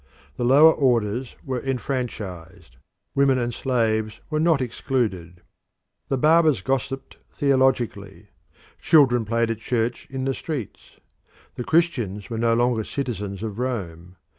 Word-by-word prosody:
The - - -3
lower 145 +6 +7
orders 120 -2 0
were 130 -2 -2
enfranchised; 115 - -5 0.4
women 135 -1 +3
and 120 -1 -2
slaves 110 -4 -1
were 155 - 0
not 160 -2 +3
excluded. 110 - -3 0.6
The 135 - 0
barbers 155 - +4
gossiped 135 0 -3
theologically. 120 -8 0 0.5
Children 125 -7 +4
played 115 +1 0
at 115 - -4
church 120 +1 -2
in 130 -1 -4
the 135 - 0
streets. 135 - -7 0.6
The 125 - -5
Christians 120 - 0
were 115 - -3
no 115 0 +2
longer 120 -1 +1
citizens 105 -7 -4
of 110 0 -5
Rome. 90 -9 -4
120 Hz, 125 wpm, -23 LUFS, 105-135 Hz, 0.6 s, lower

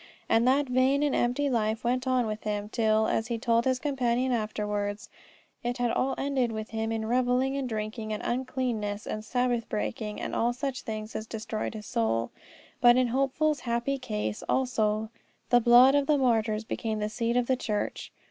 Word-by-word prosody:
And 230 +2 +3
that 275 +3 +4
vain 260 +3 +2
and 290 - +1
empty 250 +4 +1
life 225 -3 0
went 250 +2 0
on 255 -2 +2
with 215 0 -4
him, 210 -1 -3
till, 220 -1 +2
as 220 +1 0
he 235 -1 -2
told 230 0 +1
his 260 -1 +2
companion 255 -2 0
afterwards, 210 -1 -2 0.5
it 245 +1 -2
had 245 -1 +1
all 265 +3 0
ended 270 -4 0
with 215 -1 -5
him 225 0 -2
in 220 -1 -2
revelling, 250 +3 +1
and 270 -2 -2
drinking, 215 0 -4
and 210 - -3
uncleanness, 240 -5 -2
and 215 - -4
Sabbath 245 -1 -1
breaking, 110 - -3
and - - -4
all 240 +1 +1
such 270 0 -3
things 215 0 -6
as 220 - -4
destroyed 220 0 -4
his 210 -1 -7
soul. 115 -4 0 0.5
But 240 0 +6
in 255 -1 +3
Hopeful's 275 +4 +1
happy 240 +3 -1
case 105 - -3
also 220 -4 0 0.4
the 245 0 +6
blood 245 +3 +7
of 285 -1 +2
the 300 -1 +4
martyrs 225 -4 +1
became 220 0 -3
the 210 0 -1
seed 230 +2 -1
of 245 - +2
the 260 - +2
church. 215 -4 -3
235 Hz, 185 wpm, -28 LUFS, 215-255 Hz, 0.5 s, blood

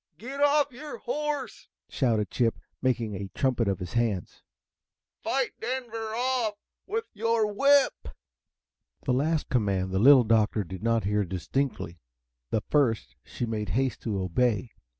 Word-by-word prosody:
"Get 270 +5 -6
off 290 0 +4
your 290 +4 -8
H - - -14
O 300 +4 -1
R 290 -3 0
S - - -14
E!" - - -28
shouted 115 -6 +1
Chip, 115 -3 +1 0.2
making 120 -4 0
a 100 0 -4
trumpet 125 -4 +1
of 100 -1 +1
his 90 +3 -7
hands. 115 -7 -1 0.8
"Fight 265 -2 0
Denver 230 -4 -4
off 245 -3 0 0.3
with 445 +3 -2
your 230 0 +1
whip!" 280 +4 +3 1.0
The 125 - +1
last 155 +4 0
command 100 -8 +1
the 95 - +1
Little 130 +3 +8
Doctor 110 -1 +2
did 95 +1 -8
not 115 0 +1
hear 105 +1 +1
distinctly. 95 - -3 0.5
The 110 - 0
first 120 -2 +1
she 120 - -4
made 110 -3 -3
haste 130 -1 0
to 105 -4 -2
obey. 110 +5 0
125 Hz, 155 wpm, -28 LUFS, -, 1.0 s, Little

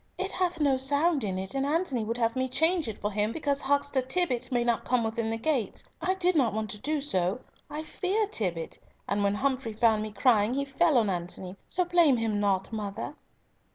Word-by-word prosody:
"It 380 +1 -2
hath 360 -2 -1
no 280 -3 +3
sound 285 +2 +2
in 190 -3 -2
it, 190 0 -4
and 270 0 0
Antony 285 -5 0
would 230 +2 -3
have 230 -1 0
me 260 0 0
change 320 +3 +2
it 220 - -5
for 205 - -2
him, 210 +1 0
because 285 0 -1
Huckster 285 -1 +1
Tibbott 255 -3 0
may 240 -1 +2
not 235 -1 0
come 250 -1 +1
within 225 0 -2
the 225 - -1
gates. 245 -3 -1 0.2
I 370 +3 +1
did 365 -1 +2
not 245 -8 +2
want 215 -2 -2
to 210 - -5
do 300 +5 -1
so; 190 -5 0 0.3
I 305 +1 -5
fear 390 +7 -1
Tibbott, 180 - -3 0.3
and 200 0 0
when 200 0 +2
Humfrey 260 -1 -1
found 220 -1 +3
me 215 0 -4
crying 215 +1 +3
he 280 0 -1
fell 285 +2 +2
on 215 -4 +2
Antony. 180 +1 -5
So 360 0 0
blame 340 -7 +4
him 220 -2 -1
not, 195 -1 0
mother." 205 -2 -4
250 Hz, 215 wpm, -28 LUFS, 215-295 Hz, 0.3 s, blame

